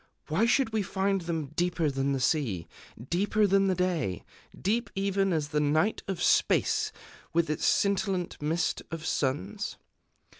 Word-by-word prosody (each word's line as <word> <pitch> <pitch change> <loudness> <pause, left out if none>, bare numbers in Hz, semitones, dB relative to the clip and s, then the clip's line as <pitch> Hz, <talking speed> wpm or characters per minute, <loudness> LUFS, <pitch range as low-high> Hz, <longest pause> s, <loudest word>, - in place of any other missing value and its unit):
Why 185 +10 +2
should 245 -1 +2
we 220 - +2
find 195 0 0
them 165 -4 -3
deeper 170 -3 +1
than 135 +1 0
the 135 - 0
sea, 120 - 0 0.4
deeper 205 +4 +2
than 195 0 +3
the 190 - +2
day, 170 - -1 0.4
deep 230 +5 0
even 195 0 +1
as 155 -3 0
the 150 0 0
night 155 +8 +2
of 185 -3 -2
Space, 430 -1 +3 0.4
with 165 -1 +2
its 150 - 0
scintillant 195 -4 +1
mist 160 +4 0
of 165 -1 -6
suns? 130 -11 -2
175 Hz, 150 wpm, -29 LUFS, 150-195 Hz, 0.4 s, than